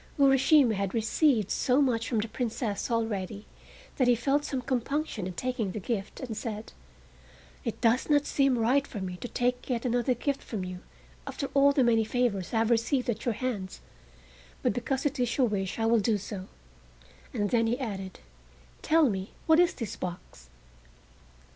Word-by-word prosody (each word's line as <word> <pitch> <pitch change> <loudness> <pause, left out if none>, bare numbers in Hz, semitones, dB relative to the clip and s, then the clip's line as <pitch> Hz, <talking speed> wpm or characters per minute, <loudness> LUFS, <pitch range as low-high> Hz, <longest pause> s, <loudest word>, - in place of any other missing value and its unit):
Urashima 270 -2 +5
had 195 -1 -2
received 225 - +2
so 255 +2 +2
much 235 -5 +1
from 235 - 0
the 220 - -3
Princess 225 -2 -3
already 215 -3 -2 0.5
that 255 - +3
he 245 - +5
felt 275 +5 +1
some 270 -3 -2
compunction 255 - -2
in 185 - -5
taking 230 -3 -2
the - - -3
gift, 200 0 -4
and 245 -5 -5
said: 215 -1 -5 0.9
"It 230 - -4
does 240 +4 +2
not 290 -1 +4
seem 275 -3 +2
right 260 +5 +2
for 210 - -6
me 180 -1 -5
to 245 - -6
take 245 +2 -1
yet 245 -1 -1
another 245 +1 +1
gift 280 +3 -2
from 200 -5 -5
you 180 0 -6 0.5
after 280 - -4
all 280 0 +6
the 275 -2 +3
many 230 -2 +4
favors 220 -6 -1
I 230 - 0
have 225 +1 +2
received 240 +2 +1
at 220 0 -6
your 235 -3 0
hands, 210 -7 -4 0.8
but - - +2
because 255 +5 -2
it 290 -1 -1
is 245 -1 0
your 265 - +4
wish 195 -4 -2
I 225 - 0
will 230 0 +4
do 215 +1 +1
so," 195 -1 -7 0.8
and 205 -1 -1
then 230 -1 +3
he 240 +3 0
added: 195 -7 -5 0.6
"Tell 320 -1 +4
me 195 -3 -3
what 320 0 +5
is 355 -1 +4
this 230 -5 -5
box?" 175 - -8
235 Hz, 180 wpm, -28 LUFS, 210-260 Hz, 0.9 s, all